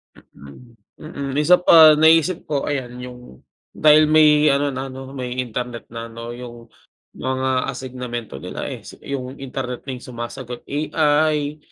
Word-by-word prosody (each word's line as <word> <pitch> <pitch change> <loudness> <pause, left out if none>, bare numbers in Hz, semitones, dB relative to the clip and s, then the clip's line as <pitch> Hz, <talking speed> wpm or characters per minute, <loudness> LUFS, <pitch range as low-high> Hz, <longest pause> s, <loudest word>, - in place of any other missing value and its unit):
Mm. 115 - -16 0.2
Mm. 140 -4 -6
Isa 175 +4 +6
pa, 160 -3 +8
naisip 160 +3 +4
ko 145 -1 -2
ayan, 125 -3 -4
yung, 125 - -11 0.3
dahil 155 0 +5
may 150 -1 +5
ano 140 +1 +1
na 130 0 -4
'no, 135 0 -9
may 125 -1 -4
Internet 120 0 -6
na 115 0 -7
'no, 115 +1 -9
yung 120 -2 -11 0.5
mga 130 0 -1
asignamento 125 - -6
nila, - - -6
eh, - - -8
si - - -13
yung 130 -2 -5
Internet 125 -2 -5
na - - -8
yung - - -13
sumasagot, 120 0 -7
AI, 150 0 +1
130 Hz, 150 wpm, -21 LUFS, 125-150 Hz, 0.5 s, pa